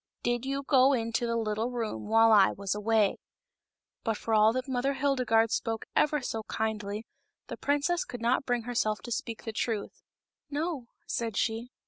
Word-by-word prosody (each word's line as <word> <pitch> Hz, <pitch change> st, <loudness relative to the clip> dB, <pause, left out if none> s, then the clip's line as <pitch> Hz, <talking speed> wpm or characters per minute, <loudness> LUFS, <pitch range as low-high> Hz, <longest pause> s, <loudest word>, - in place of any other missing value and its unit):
Did 240 Hz, +1 st, 0 dB
you 275 Hz, +1 st, -2 dB
go 270 Hz, 0 st, +5 dB
into 230 Hz, -1 st, 0 dB
the 230 Hz, -, 0 dB
little 220 Hz, +1 st, -1 dB
room 225 Hz, -, -4 dB
while 225 Hz, +1 st, +5 dB
I 205 Hz, -3 st, +6 dB
was 195 Hz, -1 st, -2 dB
away 210 Hz, -1 st, +2 dB, 0.4 s
?" -, -, -62 dB
But 225 Hz, -2 st, 0 dB
for 225 Hz, -, -3 dB
all 215 Hz, 0 st, +6 dB
that 255 Hz, +1 st, -2 dB
Mother 265 Hz, +1 st, 0 dB
Hildegarde 250 Hz, -5 st, +2 dB
spoke 225 Hz, -1 st, -2 dB
ever 300 Hz, -2 st, +2 dB
so 225 Hz, -2 st, -3 dB
kindly 215 Hz, -1 st, -2 dB, 0.4 s
the -, -, -5 dB
princess 290 Hz, +5 st, +1 dB
could 245 Hz, -, -8 dB
not 240 Hz, +3 st, +1 dB
bring 245 Hz, -3 st, -1 dB
herself 220 Hz, -3 st, -1 dB
to 240 Hz, -, -7 dB
speak 230 Hz, 0 st, -4 dB
the 225 Hz, -, -5 dB
truth. 220 Hz, -2 st, -3 dB, 0.3 s
" -, -, -64 dB
No," 295 Hz, -3 st, -3 dB, 0.2 s
said 230 Hz, -3 st, -3 dB
she. 225 Hz, +2 st, -1 dB
230 Hz, 180 wpm, -29 LUFS, 220-255 Hz, 0.4 s, I